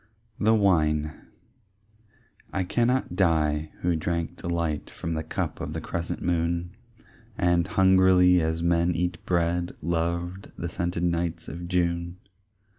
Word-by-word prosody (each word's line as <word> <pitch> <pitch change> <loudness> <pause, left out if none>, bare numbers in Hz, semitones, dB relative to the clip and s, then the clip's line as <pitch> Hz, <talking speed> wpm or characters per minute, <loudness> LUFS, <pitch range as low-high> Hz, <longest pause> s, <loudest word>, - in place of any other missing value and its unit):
The 110 +2 +4
Wine 75 -7 +2 1.4
I 95 - 0
cannot 120 0 0
die, 80 -4 +1
who 85 -1 +1
drank 85 +1 -2
delight 85 -3 -2
From 85 - -5
the 80 - -1
cup 80 - -4
of - - -4
the - - -3
crescent 85 0 -4
moon, 85 0 0 0.7
And 85 0 +2
hungrily 95 -2 +5
as 80 +1 -1
men 85 0 +2
eat 90 0 -2
bread, 85 0 0
Loved 85 +3 -2
the 85 - -3
scented 85 0 -2
nights 85 -1 -1
of 85 +1 -6
June. 85 -1 -1
85 Hz, 125 wpm, -26 LUFS, 85-90 Hz, 1.4 s, hungrily